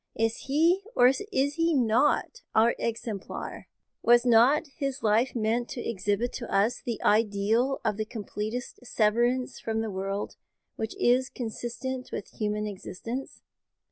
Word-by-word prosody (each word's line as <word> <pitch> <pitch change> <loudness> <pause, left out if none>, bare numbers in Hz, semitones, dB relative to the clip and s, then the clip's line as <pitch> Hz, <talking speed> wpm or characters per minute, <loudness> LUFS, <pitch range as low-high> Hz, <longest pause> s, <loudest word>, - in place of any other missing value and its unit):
Is 225 0 +1
He, 330 +7 +3
or 245 - +7
is 265 - 0
He 330 0 +1
not, 260 - +2
our 225 +2 +5
exemplar? 225 -3 -4 0.3
Was 240 +1 +5
not 245 +6 +5
His 275 -2 -3
life 225 +5 +2
meant 230 +2 0
to 240 - -5
exhibit 205 +3 -1
to 235 - -7
us 210 +5 +2
the 235 -3 -3
ideal 220 +5 +2
of 205 - +1
the 215 - -1
completest 215 +2 -5
severance 240 +3 +1
from 220 0 -2
the 220 -1 -3
world 195 +1 -4 0.4
which 220 0 -4
is 255 +2 +3
consistent 250 +2 -5
with - - -5
human 210 0 -1
existence? 220 +5 -6
235 Hz, 140 wpm, -28 LUFS, 215-255 Hz, 0.4 s, or